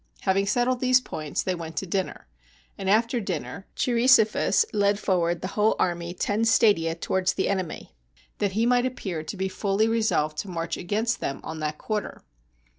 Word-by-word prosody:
Having 195 +1 +1
settled 245 +4 +1
these 255 0 +4
points, 155 - -4
they 185 - 0
went 165 -3 -7
to 190 - -1
dinner; 190 +1 -3 0.5
and 190 -1 -3
after 230 +4 +2
dinner 200 -1 -5
Cheirisophus 240 - +4
led 200 0 +2
for 190 -3 +1
ward 170 0 0
the 185 - -3
whole 210 +2 +2
army 175 -1 -1
ten 205 +4 0
stadia 205 -8 +3
towards 190 +2 0
the 190 - -1
enemy, 185 -4 -3 0.5
that 200 -2 0
he 225 +3 +1
might 245 +1 +3
appear 190 -10 -4
to 160 +6 -7
be 190 +1 -1
fully 195 +3 0
resolved 215 -10 0
to 200 - -4
march 165 -2 -3
against 220 +6 -1
them 135 - -3
on 160 0 -6
that 150 0 -3
quarter. 215 -2 -4
195 Hz, 180 wpm, -25 LUFS, 175-225 Hz, 0.5 s, these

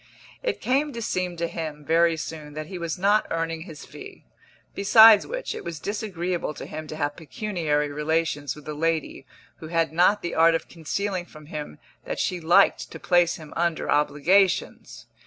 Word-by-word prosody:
It - - -2
came 280 +4 +1
to 235 - -5
seem 180 -4 -2
to 170 0 -1
him, 155 -3 -6
very 165 +1 +3
soon, 155 -2 -7
that 155 0 -5
he 180 +2 -7
was 170 -1 -3
not 205 +3 +2
earning 165 0 -2
his 160 -3 -10
fee; - - -12 0.5
besides 220 +1 +7
which, - - -4
it - - -7
was 170 -2 -6
disagreeable 180 -6 -3
to - - -7
him 155 0 -7
to 155 - -7
have 145 -1 -2
pecuniary 160 -4 -2
relations 150 -2 -1
with 150 -1 -14
a 150 - -4
lady 160 -3 -2 0.3
who 160 - -9
had 165 -1 0
not 180 +5 +3
the 175 - -3
art 165 +1 +5
of 165 - -3
concealing 180 +3 -3
from 155 -1 -14
him 150 - -7 0.3
that - - -4
she 180 - -1
liked 175 +5 +3
to - - -9
place 175 -2 +3
him 155 -4 -11
under 170 -1 -1
obligations. 145 -5 +1
165 Hz, 180 wpm, -25 LUFS, 155-185 Hz, 0.5 s, besides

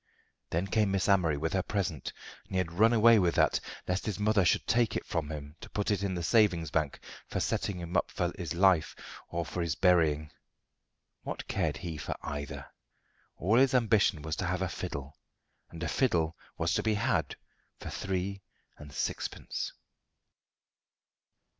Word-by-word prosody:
Then 85 +4 0
came 105 +1 +2
Miss 95 -1 +1
Amory 90 -7 +3
with 80 +3 -2
her 95 - +2
present, 90 -9 -2 0.3
and - - -12
he - - +2
had 90 -3 0
run 110 +7 +4
away 115 -1 +6
with 90 -3 +2
that, - - +3 0.3
lest 90 +3 -1
his 105 - -1
mother 105 -1 +3
should 85 - +2
take 115 -1 +2
it - - -2
from 80 -3 -2
him 75 -1 -7
to - - -9
put 105 0 -1
in 100 -2 0
the 85 - -3
savings 85 -3 +3
bank 75 -3 0 0.3
for - - -2
setting 100 - -1
him 85 0 -6
up - - +2
in 85 -1 -2
life 95 -5 +4 0.3
or 85 0 -2
for 90 - -4
his 85 -2 -1
burying. 80 -5 +3 0.9
What - - -6
cared - - 0
he 80 -3 -5
for 70 - -4
either? 75 -1 -5 0.7
All 105 +7 +2
his 135 0 +4
ambition 110 -9 +3
was 80 -1 -2
to 95 - -1
have 90 +2 0
a 95 - -1
fiddle, 70 -3 -6 0.5
and 85 0 -7
a - - -1
fiddle 85 - +1 0.2
was - - +1
to - - +2
be 110 -1 +1
had - - 0 0.4
for - - -7
three 95 +1 -3 0.4
and 75 -1 -10
sixpence. - - -3
90 Hz, 170 wpm, -30 LUFS, 80-100 Hz, 0.9 s, away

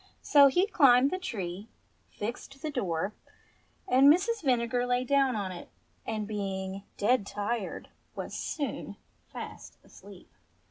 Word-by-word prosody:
So 285 -1 +7
he 355 +8 +3
climbed 275 - +5
the 370 - -2
tree, 200 - -5 0.4
fixed 240 +5 -6
the 310 - -2
door, 195 - -2 0.7
and 270 +3 +7
Mrs. 415 +7 +1
Vinegar 245 -2 +1
lay 245 0 +1
down 270 -1 +2
on 200 -3 -3
it, 175 - -9 0.4
and 215 -2 -3
being 195 -2 -4 0.2
dead 235 +2 +2
tired 205 +1 -3 0.3
was - - -6
soon 290 -3 -4 0.3
fast - - -9
asleep. - - -15
245 Hz, 130 wpm, -29 LUFS, 205-280 Hz, 0.7 s, So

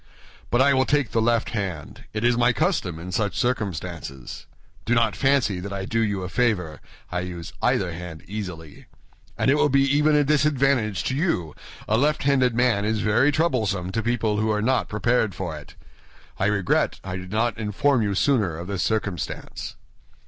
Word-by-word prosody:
But 120 +2 +4
I 140 0 +4
will 130 0 +2
take 145 -6 +1
the 115 - +1
left 115 0 +1
hand—it 100 - -5
is 120 0 +4
my 120 +1 +3
custom 90 -5 0
in 90 +3 -7
such 105 +1 -1
circumstances. 85 - -3 0.4
Do 120 - +1
not 115 -3 +2
fancy 135 -9 +2
that 100 +2 -6
I 95 -1 -4
do 115 +3 -1
you 100 -4 0
a - - -3
favor; 90 -8 0 0.3
I 90 - -1
use 90 -2 -6
either 90 -3 +1
hand 85 -1 -8
easily. 90 -7 -7 0.5
And 130 - +3
it 145 - +3
will 150 - +3
be 135 0 +4
even 150 +2 +3
a 150 - +4
disadvantage 135 -7 +2
to 130 - -1
you; 135 - -1 0.3
a 110 +2 +2
left 150 +3 +1
handed 130 -4 +3
man 120 -4 +2
is 110 0 0
very 120 +7 +3
troublesome 110 - 0
to 115 - -1
people 110 -2 0
who 110 +1 +1
are 105 - 0
not 130 +5 +1
prepared 110 -2 +1
for 85 -3 -4
it. 75 -1 -12 0.6
I 100 - +2
regret 100 -3 +1
I 90 -1 -5
did 90 0 -9
not 110 +1 0
inform 115 +5 +1
you 100 -2 0
sooner 105 - +1
of 85 - -6
this 95 -1 -3
circumstance." 105 -7 -3
110 Hz, 185 wpm, -24 LUFS, 90-125 Hz, 0.6 s, But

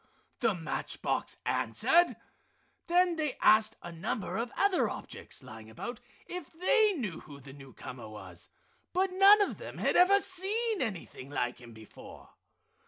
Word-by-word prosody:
the 230 -5 +2
match 165 -3 -4
box - - -1
answered. 345 +1 +3 0.7
Then 355 -1 +3
they 300 -4 -2
asked 215 0 +5
a - - -7
number 185 +4 -4
of 235 +2 -3
other 400 -2 +3
objects - - -7
lying 110 -3 -11
about 240 - -7 0.3
if 355 -3 -7
they 420 +5 +3
knew 215 - -4
who 145 -2 -12
the 135 0 -12
newcomer 130 -4 -10
was, 105 0 -11 0.4
but 375 +1 +1
none 400 +2 +7
of - - -4
them - - -8
had - - +1
ever 390 +3 +6
seen 405 +3 -1
anything 185 - -5
like 125 -3 -2
him 120 -1 -12
before. 110 -1 -13
240 Hz, 150 wpm, -30 LUFS, -, 0.7 s, none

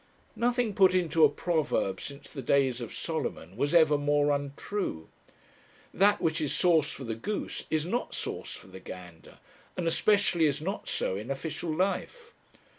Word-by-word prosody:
Nothing 240 -2 +1
put 190 -1 +5
into 165 -3 +3
a 150 - +8
proverb 145 - -1
since 140 0 -8
the 135 - -7
days 130 -1 +2
of 115 - -6
Solomon 85 +4 -4
was 145 +8 0
ever 155 -3 +5
more 145 0 +2
untrue. 140 - -3 0.8
That 205 +2 +4
which 160 -1 0
is 145 -2 0
sauce 165 -3 +3
for 135 - -7
the 115 -3 -3
goose 200 - -4
is 155 -1 0
not 235 +8 -2
sauce - - -4
for - - -12
the 95 0 -11
gander, 90 -3 -11 0.4
and 175 -2 -1
especially 190 -1 +3
is 145 0 +1
not 190 +7 -4
so 95 - -1
in 110 +5 -7
official 155 +4 -4
life. 200 - -2
155 Hz, 165 wpm, -29 LUFS, 135-185 Hz, 0.8 s, a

